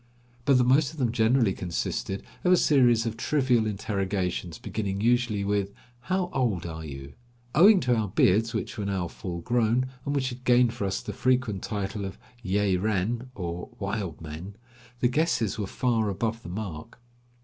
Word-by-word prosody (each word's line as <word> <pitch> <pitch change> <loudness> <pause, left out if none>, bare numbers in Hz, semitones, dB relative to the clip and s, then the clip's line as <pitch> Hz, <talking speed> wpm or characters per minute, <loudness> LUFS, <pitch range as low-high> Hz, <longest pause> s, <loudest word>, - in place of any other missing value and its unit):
But 140 -2 +5
the 125 - +4
most 135 +3 +3
of - - -13
them 125 -5 +1
generally 115 -2 +3
consisted 95 +2 -3 0.2
of 180 - +3
a 180 - +7
series 120 -8 +4
of 115 -1 -2
trivial 125 -4 +2
interrogations 95 -4 -2
beginning 100 -3 -3
usually 120 -2 +2
with: 100 0 0 0.3
"How 180 +6 -1
old 110 -10 0
are 80 -1 -6
you?" 70 -2 -8 0.4
Owing 195 +6 +7
to 125 -1 +2
our 110 -2 0
beards, 105 +4 +3
which 110 0 -4
were 105 - -2
now 95 -3 -1
full 85 0 -6
grown, 120 +3 +2 0.2
and 145 +1 -2
which 130 -2 0
had 125 0 -9
gained 120 -2 +4
for 100 - -3
us 95 - -1
the 105 - -5
frequent 125 -4 +1
title 100 0 -3
of 95 -1 -6 0.2
yeh 100 -2 +1
renn, 110 +5 -1
or 90 -2 -5
wild 100 -5 -3
men, 80 +5 -8 0.5
the 125 - +5
guesses 125 - 0
were 100 - -2
far 115 -1 0
above 110 +4 -2
the - - -9
mark. 95 0 -6
110 Hz, 175 wpm, -27 LUFS, 95-125 Hz, 0.5 s, a